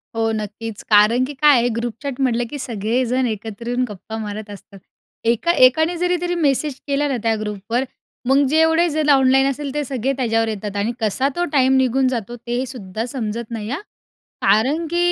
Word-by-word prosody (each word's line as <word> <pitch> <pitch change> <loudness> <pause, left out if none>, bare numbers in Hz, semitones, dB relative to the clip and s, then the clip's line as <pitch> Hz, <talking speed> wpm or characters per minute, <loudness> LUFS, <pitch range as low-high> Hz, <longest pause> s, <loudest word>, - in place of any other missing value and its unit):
हो, 225 0 +1
नक्कीच. 215 0 -5
कारण 215 +4 +5
की 290 - -7
काय 290 0 +5
आहे 235 - +1
ग्रुपचॅट 240 +3 -4
म्हटलं, 245 -2 +1
की 295 - -6
सगळेजण 245 +3 -1
एकत्र 220 +1 -6
येऊन 245 +1 0
गप्पा 210 +2 -8
मारत 215 0 -6
असतात. 200 -1 -12 0.4
एका 235 +9 +2
एकाने 315 +7 +2
जरी 360 +1 +1
जरी 350 0 -2
मेसेज 295 -3 +1
केला 285 +1 +1
ना 270 -3 -1
त्या 225 -1 +2
ग्रुपवर, 215 +3 -2 0.4
मग 275 +2 +4
जेवढे 320 +3 +4
जण 305 -1 0
ऑनलाईन 270 -1 +5
असेल 275 0 -4
ते 295 0 -1
सगळे 265 0 -1
त्याच्यावर 225 -3 +1
येतात 210 -2 -4
आणि 205 +3 0
कसा 220 +4 0
तो 350 - 0
टाईम 265 -1 +4
निघून 260 0 +2
जातो 240 -2 -3
ते 240 +2 -1
सुद्धा 225 -4 -5
समजत 235 -2 -4
नाही 220 -2 -5
हां. 280 +8 -3 0.6
कारण 245 +12 +2
की 345 +2 -2
245 Hz, 185 wpm, -20 LUFS, 220-275 Hz, 0.6 s, कारण